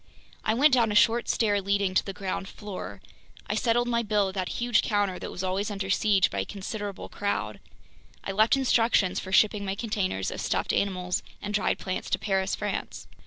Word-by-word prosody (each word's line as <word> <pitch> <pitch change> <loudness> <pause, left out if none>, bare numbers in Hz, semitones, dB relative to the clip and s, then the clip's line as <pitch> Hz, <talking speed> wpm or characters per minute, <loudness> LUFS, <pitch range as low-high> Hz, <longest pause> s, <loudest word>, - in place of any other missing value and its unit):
I 220 - +1
went 280 +3 +5
down 235 -4 +4
a - - -2
short 230 +2 +4
stair 205 -3 +2
leading 200 -1 0
to - - +3
the 195 - -5
ground 190 0 -4
floor. 205 -2 -8 0.4
I - - -2
settled 240 0 +1
my 235 -1 +1
bill 210 -3 +1
at - - -8
that 185 -2 -2
huge 240 -3 +2
counter 205 -4 0
that - - -6
was 180 - -6
always 190 +3 -1
under 195 -2 -3
siege 195 -1 +3
by 100 - -2
a 95 - -1
considerable 200 - -6
crowd. 205 0 -3 0.6
I - - -3
left 215 +6 +4
instructions 230 -7 +2
for 190 - -7
shipping 210 +1 +4
my 195 0 -2
containers 200 - -2
of - - -5
stuffed - - -1
animals 180 -2 0 0.2
and 205 0 -5
dried 210 - +1
plants 185 -1 -4
to - - +1
Paris, 190 -2 0
France. 205 -1 -4
205 Hz, 200 wpm, -27 LUFS, 190-220 Hz, 0.6 s, went